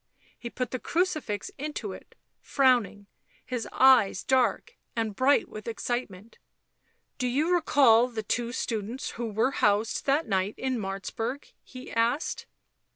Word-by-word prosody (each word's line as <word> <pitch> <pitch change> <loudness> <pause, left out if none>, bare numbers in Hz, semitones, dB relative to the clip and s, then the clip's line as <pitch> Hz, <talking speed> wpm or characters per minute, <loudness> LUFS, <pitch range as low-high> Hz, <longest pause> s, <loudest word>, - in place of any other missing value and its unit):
He 235 - -6
put 250 +1 -4
the 255 - -3
crucifix 310 - -1
into 300 +2 -4
it, - - -14 0.3
frowning, 245 -7 +2 0.4
his 250 -3 -4
eyes 255 -8 +5
dark 260 - +1 0.2
and 225 -3 -2
bright 270 +5 +3
with 215 +1 -10
excitement. 230 -3 -4 0.4
" - - -45
Do 250 - 0
you 295 +8 +1
recall 265 -8 +5
the 225 -3 -5
two 235 +3 -2
students 230 0 -3
who 235 0 -4
were 220 +5 +1
housed 215 -1 +1
that 285 +4 +2
night 195 0 0
in 260 -2 -2
Martzburg 225 +6 -5
?" - - -49
he 255 0 -11
asked. 230 +6 -1
240 Hz, 145 wpm, -27 LUFS, 220-265 Hz, 0.4 s, eyes